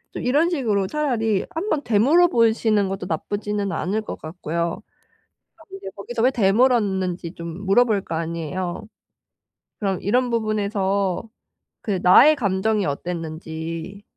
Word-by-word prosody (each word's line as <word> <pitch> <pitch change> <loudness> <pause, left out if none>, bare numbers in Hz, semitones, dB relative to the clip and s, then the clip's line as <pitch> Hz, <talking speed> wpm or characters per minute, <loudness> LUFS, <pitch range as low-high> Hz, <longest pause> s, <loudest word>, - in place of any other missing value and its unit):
이런 295 +7 +2
식으로 220 - 0
차라리 225 -9 0
한번 320 -3 -1
되물어 270 +11 +4
보시는 220 - +2
것도 195 -1 -4
나쁘지는 205 +4 -2
않을 200 +7 -1
것 215 - -7
같고요. 170 +1 -3 0.8
아 325 - -18
근데 390 0 -10
거기서 225 +3 -4
왜 255 - +5
되물었는지 195 -6 +1
좀 170 +3 -7
물어볼 210 0 +3
거 165 - -6
아니에요. 170 +3 -4 0.9
그럼 195 -4 -1
이런 245 +5 +1
부분에서 200 -2 -1 0.5
그 200 -5 -2
나의 285 +12 +7
감정이 205 -2 0
어땠는지 165 +3 -5
200 Hz, 285 characters per minute, -22 LUFS, 180-230 Hz, 0.9 s, 나의